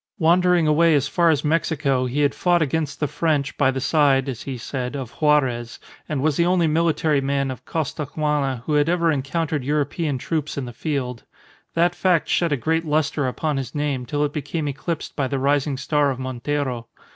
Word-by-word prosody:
Wandering 175 Hz, 0 st, +3 dB
away 155 Hz, +1 st, +4 dB
as 140 Hz, -1 st, +1 dB
far 170 Hz, +2 st, +2 dB
as 150 Hz, -3 st, +2 dB
Mexico 150 Hz, -4 st, +1 dB
he 140 Hz, +4 st, -1 dB
had 145 Hz, -1 st, +2 dB
fought 175 Hz, -2 st, +2 dB
against 150 Hz, 0 st, -2 dB
the 150 Hz, -, 0 dB
French 145 Hz, -1 st, 0 dB
by 135 Hz, -3 st, +3 dB
the 135 Hz, 0 st, -1 dB
side 140 Hz, -1 st, +3 dB
(as 130 Hz, -5 st, -4 dB
he 135 Hz, -2 st, -5 dB
said) 125 Hz, +2 st, -4 dB
of 130 Hz, -4 st, -5 dB
Juarez, 130 Hz, -6 st, +1 dB, 0.3 s
and 140 Hz, -3 st, -1 dB
was 155 Hz, -2 st, +1 dB
the 170 Hz, -, +3 dB
only 180 Hz, -2 st, +3 dB
military 155 Hz, -2 st, +2 dB
man 140 Hz, 0 st, 0 dB
of 130 Hz, -, -9 dB
Costaguana 150 Hz, -4 st, -2 dB
who 150 Hz, -, -1 dB
had 150 Hz, +1 st, +3 dB
ever 170 Hz, -1 st, +2 dB
encountered 150 Hz, +1 st, -1 dB
European 150 Hz, +1 st, -1 dB
troops 155 Hz, +3 st, -3 dB
in 135 Hz, -, -2 dB
the 120 Hz, -, -8 dB
field. 125 Hz, -3 st, -3 dB, 0.5 s
That 170 Hz, +1 st, +3 dB
fact 180 Hz, -3 st, +1 dB
shed 170 Hz, -2 st, +1 dB
a 145 Hz, -, +2 dB
great 160 Hz, +6 st, 0 dB
lustre 150 Hz, -2 st, 0 dB
upon 150 Hz, +3 st, -2 dB
his 130 Hz, 0 st, -5 dB
name 140 Hz, -4 st, -2 dB
till 145 Hz, +3 st, 0 dB
it 145 Hz, -, -4 dB
became 150 Hz, +1 st, -3 dB
eclipsed 145 Hz, +4 st, -4 dB
by 135 Hz, -3 st, 0 dB
the 135 Hz, -, -2 dB
rising 140 Hz, +1 st, +1 dB
star 145 Hz, +1 st, +1 dB
of 130 Hz, -, -2 dB
Montero. 130 Hz, -1 st, -3 dB
145 Hz, 195 wpm, -22 LUFS, 135-160 Hz, 0.5 s, away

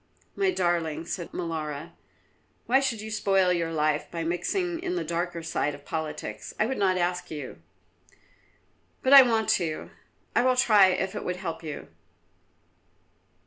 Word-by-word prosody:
"My 390 Hz, -1 st, +2 dB
darling," 170 Hz, -, 0 dB
said 170 Hz, 0 st, -5 dB
Molara, 160 Hz, -2 st, -4 dB, 0.7 s
"why 260 Hz, +3 st, +4 dB
should 260 Hz, -6 st, -1 dB
you 220 Hz, 0 st, -7 dB
spoil 195 Hz, -4 st, +2 dB
your 165 Hz, -2 st, -1 dB
life 155 Hz, -1 st, 0 dB
by 170 Hz, -1 st, -4 dB
mixing 335 Hz, -, -1 dB
in 360 Hz, -1 st, -2 dB
the 355 Hz, -, -1 dB
darker 170 Hz, 0 st, -3 dB
side 150 Hz, -2 st, -1 dB
of 145 Hz, -, -16 dB
politics? 150 Hz, -9 st, -5 dB
I 215 Hz, -, +3 dB
would 265 Hz, +3 st, -2 dB
not 190 Hz, -2 st, +2 dB
ask 180 Hz, 0 st, -1 dB
you." 145 Hz, -4 st, -7 dB, 1.4 s
"But 260 Hz, -, +4 dB
I 275 Hz, -, +13 dB
want 225 Hz, -4 st, +2 dB
to. 155 Hz, -2 st, -4 dB, 0.4 s
I -, -, +5 dB
will 255 Hz, 0 st, +3 dB
try 210 Hz, -6 st, +6 dB
if 185 Hz, 0 st, -1 dB
it -, -, -5 dB
would 180 Hz, -, -2 dB
help 170 Hz, -3 st, -5 dB
you." 155 Hz, -3 st, -7 dB
175 Hz, 155 wpm, -27 LUFS, 160-220 Hz, 1.4 s, I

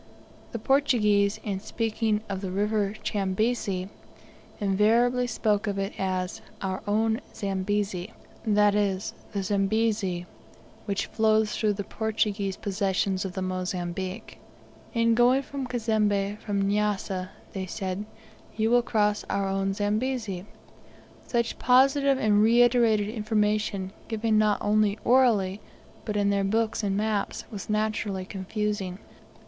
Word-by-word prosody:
The -, -, -3 dB
Portuguese, 215 Hz, -6 st, +2 dB
in 200 Hz, -3 st, -2 dB
speaking 220 Hz, 0 st, -1 dB
of 195 Hz, -1 st, -4 dB
the 190 Hz, -, -3 dB
River 205 Hz, +1 st, 0 dB
Chambezi, 195 Hz, -1 st, -1 dB, 0.7 s
invariably 230 Hz, +5 st, +3 dB
spoke 215 Hz, -2 st, 0 dB
of 200 Hz, -1 st, -1 dB
it 195 Hz, +1 st, -2 dB
as 185 Hz, -1 st, -2 dB, 0.2 s
"our 190 Hz, -1 st, -3 dB
own 220 Hz, +3 st, +1 dB
Zambezi," 195 Hz, 0 st, -2 dB, 0.3 s
that 210 Hz, -2 st, +4 dB
is, 200 Hz, -1 st, 0 dB, 0.2 s
the 200 Hz, -2 st, -1 dB
Zambezi 200 Hz, -2 st, 0 dB, 0.6 s
which 200 Hz, -2 st, -1 dB
flows 220 Hz, -1 st, +2 dB
through 215 Hz, -2 st, +1 dB
the 200 Hz, 0 st, -4 dB
Portuguese 210 Hz, -2 st, -1 dB
possessions 195 Hz, -1 st, -1 dB
of 185 Hz, -, -4 dB
the 190 Hz, -, -3 dB
Mozambique. 185 Hz, +2 st, -4 dB, 0.5 s
"In 230 Hz, -1 st, +3 dB
going 245 Hz, +4 st, +4 dB
to 275 Hz, 0 st, -5 dB
Cazembe 210 Hz, -4 st, 0 dB
from 200 Hz, -2 st, -1 dB
Nyassa," 200 Hz, -2 st, -1 dB, 0.4 s
said 185 Hz, 0 st, -3 dB
they, 220 Hz, 0 st, -10 dB
"you 225 Hz, -, +2 dB
will 245 Hz, 0 st, +5 dB
cross 210 Hz, -3 st, +1 dB
our 195 Hz, 0 st, 0 dB
own 195 Hz, 0 st, 0 dB
Zambezi." 210 Hz, -2 st, -2 dB, 0.8 s
Such 235 Hz, -1 st, -1 dB
positive 270 Hz, +2 st, +4 dB
and 210 Hz, -4 st, +3 dB
reiterated 230 Hz, -2 st, +4 dB
information 210 Hz, -3 st, 0 dB, 0.2 s
given 220 Hz, -1 st, +1 dB
not 210 Hz, -1 st, +3 dB
only 210 Hz, 0 st, +2 dB
orally, 215 Hz, -6 st, +3 dB, 0.4 s
but 210 Hz, -2 st, -2 dB
in 200 Hz, 0 st, +2 dB
their 200 Hz, 0 st, +1 dB
books 220 Hz, +3 st, 0 dB
and 200 Hz, -2 st, 0 dB
maps 210 Hz, -1 st, -1 dB
was 205 Hz, -2 st, -7 dB
naturally 210 Hz, -3 st, -1 dB
confusing. 195 Hz, -1 st, -3 dB
210 Hz, 125 wpm, -27 LUFS, 195-220 Hz, 0.8 s, will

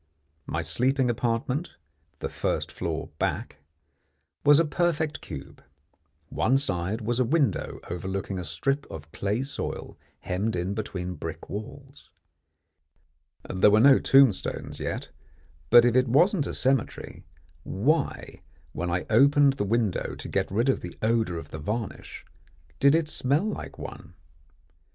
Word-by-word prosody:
My -, -, -2 dB
sleeping 130 Hz, 0 st, +2 dB
apartment 120 Hz, +6 st, -2 dB, 0.5 s
the -, -, -1 dB
first -, -, -2 dB
floor -, -, -4 dB
back -, -, -2 dB, 0.9 s
was 145 Hz, +1 st, +7 dB
a 165 Hz, -, +3 dB
perfect 160 Hz, -1 st, -1 dB
cube. 70 Hz, -5 st, -9 dB, 0.7 s
One 130 Hz, +4 st, +2 dB
side 100 Hz, -4 st, -1 dB
was 120 Hz, +3 st, -1 dB
a -, -, +4 dB
window 135 Hz, -, 0 dB
overlooking 95 Hz, +2 st, -4 dB
a -, -, -4 dB
strip 135 Hz, -, -1 dB
of 80 Hz, -1 st, -9 dB
clay 105 Hz, +8 st, -1 dB
soil 140 Hz, -, -5 dB, 0.2 s
hemmed 95 Hz, +4 st, -2 dB
in 90 Hz, +3 st, -2 dB
between 95 Hz, -4 st, -4 dB
brick 80 Hz, -, -7 dB
walls. 135 Hz, +7 st, -9 dB, 1.4 s
There 95 Hz, +2 st, +4 dB
were 105 Hz, +1 st, +5 dB
no 135 Hz, +3 st, +7 dB
tombstones 135 Hz, -7 st, +3 dB
yet, -, -, -4 dB, 0.6 s
but 120 Hz, +5 st, +8 dB
if 120 Hz, -1 st, +2 dB
it 130 Hz, 0 st, +4 dB
wasn't 150 Hz, -, +3 dB
a -, -, -3 dB
cemetery, 130 Hz, -2 st, -1 dB, 0.4 s
why, 140 Hz, -, -1 dB, 0.3 s
when 90 Hz, +3 st, -3 dB
I 90 Hz, +1 st, -1 dB
opened 140 Hz, +4 st, +5 dB
the 135 Hz, -6 st, -2 dB
window 110 Hz, -2 st, 0 dB
to -, -, -8 dB
get -, -, -1 dB
rid 115 Hz, +6 st, 0 dB
of 135 Hz, -, +2 dB
the 90 Hz, -, -8 dB
odour 110 Hz, -6 st, +1 dB
of 80 Hz, -2 st, -9 dB
the 75 Hz, -, -6 dB
varnish, 105 Hz, +7 st, -5 dB, 0.5 s
did 140 Hz, +2 st, +5 dB
it 165 Hz, -2 st, +1 dB
smell 145 Hz, +4 st, +1 dB
like 215 Hz, -, -5 dB
one? -, -, -9 dB
120 Hz, 140 wpm, -26 LUFS, 95-140 Hz, 1.4 s, but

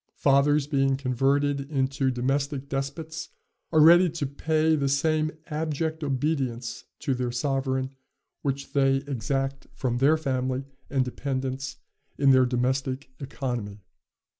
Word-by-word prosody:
Fathers, 140 Hz, +1 st, +3 dB
being 135 Hz, -2 st, +1 dB
converted 140 Hz, +2 st, +1 dB
into 135 Hz, -1 st, 0 dB
domestic 135 Hz, +2 st, -1 dB
despots, 145 Hz, +4 st, -4 dB, 0.4 s
are 160 Hz, -, +4 dB
ready 175 Hz, +3 st, +8 dB
to 160 Hz, -2 st, -3 dB
pay 155 Hz, +3 st, +1 dB
the 140 Hz, -2 st, 0 dB
same 155 Hz, +2 st, +2 dB, 0.2 s
abject 160 Hz, 0 st, -2 dB
obedience 130 Hz, -4 st, -2 dB, 0.2 s
to 140 Hz, -4 st, 0 dB
their 125 Hz, -1 st, -2 dB
sovereign 130 Hz, +1 st, -1 dB, 0.5 s
which 140 Hz, 0 st, -3 dB
they 135 Hz, -1 st, +4 dB
exact 135 Hz, +1 st, -2 dB
from 120 Hz, -2 st, -1 dB
their 145 Hz, +4 st, +5 dB
family 130 Hz, -3 st, -1 dB, 0.3 s
and 135 Hz, -2 st, +1 dB
dependents 130 Hz, 0 st, -3 dB, 0.4 s
in 140 Hz, -1 st, +5 dB
their 130 Hz, -1 st, +5 dB
domestic 130 Hz, +2 st, -1 dB
economy." 120 Hz, -7 st, -4 dB
135 Hz, 120 wpm, -26 LUFS, 130-145 Hz, 0.5 s, ready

